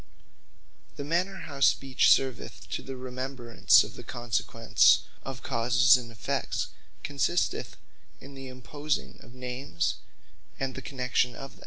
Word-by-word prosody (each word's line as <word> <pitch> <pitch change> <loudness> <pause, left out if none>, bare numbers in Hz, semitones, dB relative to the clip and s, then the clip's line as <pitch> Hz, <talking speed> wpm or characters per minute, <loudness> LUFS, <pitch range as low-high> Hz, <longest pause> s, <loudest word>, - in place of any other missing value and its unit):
The 140 - -5
manner 180 +6 -1
how 140 -3 -8
Speech 135 -1 +4
serveth 130 -2 0
to - - -2
the 135 - -7
remembrance 130 -1 +2
of - - -9
the - - -9
consequence 115 -1 +2 0.2
of 130 -2 -7
causes 125 0 +4
and 120 -2 -4
effects, 110 - -2 0.3
consisteth 145 +5 -1 0.4
in 140 - -12
the 135 -1 -9
imposing 130 - -4
of 120 - -15
Names, 125 -8 -2 0.6
and 135 -1 -2
the - - -7
Connexion 125 -2 -1
of 135 0 -8
them. - - -20
130 Hz, 135 wpm, -28 LUFS, 120-135 Hz, 0.6 s, Speech